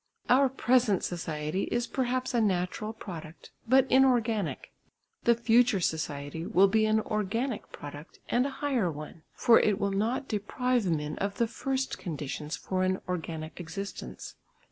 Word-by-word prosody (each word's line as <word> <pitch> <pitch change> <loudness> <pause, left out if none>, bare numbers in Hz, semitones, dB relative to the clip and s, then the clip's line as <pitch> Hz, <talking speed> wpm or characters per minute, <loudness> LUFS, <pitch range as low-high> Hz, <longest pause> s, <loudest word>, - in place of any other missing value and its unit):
Our 265 +2 +6
present 245 -5 +2
society 160 0 -2
is 240 0 -1
perhaps 255 0 -1
a 235 - +3
natural 195 +1 0
product, 170 -7 -9 0.2
but 265 +1 +6
inorganic; 240 -7 +2 0.5
the 235 - +6
future 235 -2 +4
society 155 -2 -2
will 190 +3 +4
be 215 +2 +3
an 220 0 +3
organic 215 +4 -2
product 145 +2 -9
and 250 +3 +2
a 275 - -7
higher 240 -11 +1
one, 155 +2 -9
for 230 - +6
it 210 -2 +2
will 200 0 0
not 230 +7 -1
deprive 235 +1 0
men 150 -2 -2
of 200 0 -2
the 235 - +3
first 265 +3 -2
conditions 150 -2 -4
for 185 -1 -2
an 185 0 +1
organic 160 -3 -4
existence. 180 +4 -6
205 Hz, 145 wpm, -29 LUFS, 170-240 Hz, 0.5 s, Our